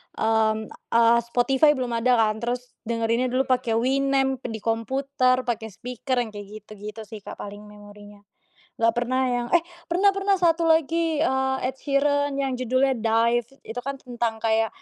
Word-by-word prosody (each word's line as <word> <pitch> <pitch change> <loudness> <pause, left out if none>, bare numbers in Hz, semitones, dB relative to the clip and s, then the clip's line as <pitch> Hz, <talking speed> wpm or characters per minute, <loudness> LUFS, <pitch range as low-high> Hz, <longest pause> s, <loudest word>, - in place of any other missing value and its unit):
mmm, 220 -1 +1 0.2
eee, 235 0 +6
Spotify 270 +5 +3
belum 250 -2 -3
ada 240 +2 +2
kan, 220 -1 +2
terus 245 +1 -4 0.2
dengerinnya 230 +2 0
dulu 255 +2 +1
pakai 245 -3 +1
Winamp 270 +1 +1
di 220 -2 -6
komputer, 255 +2 +1
pakai 230 -2 -3
speaker, 250 +4 -4
yang 220 - -9
kayak 205 -1 -9 0.2
gitu-gitu 215 +1 -9
sih, 215 0 -10
Kak, - - -9
paling 205 +1 -9
memorinya. 205 0 -14 0.5
Enggak 230 0 +3
pernah 255 +2 0
yang 240 0 -1
eh, 335 - +4 0.2
pernah, 385 +4 +3
pernah, 390 0 +1
satu 335 -2 +2
lagi, 325 0 +2
eee, 265 -2 +1
Ed 260 +1 -3
Sheeran 285 0 +1
yang 270 -2 -2
judulnya 255 +2 +2
Dive. 230 +1 +2 0.2
Itu 235 +2 -6
kan 275 +2 -4
tentang 240 -3 -3
kayak, 225 0 +2
245 Hz, 160 wpm, -24 LUFS, 225-270 Hz, 0.5 s, eee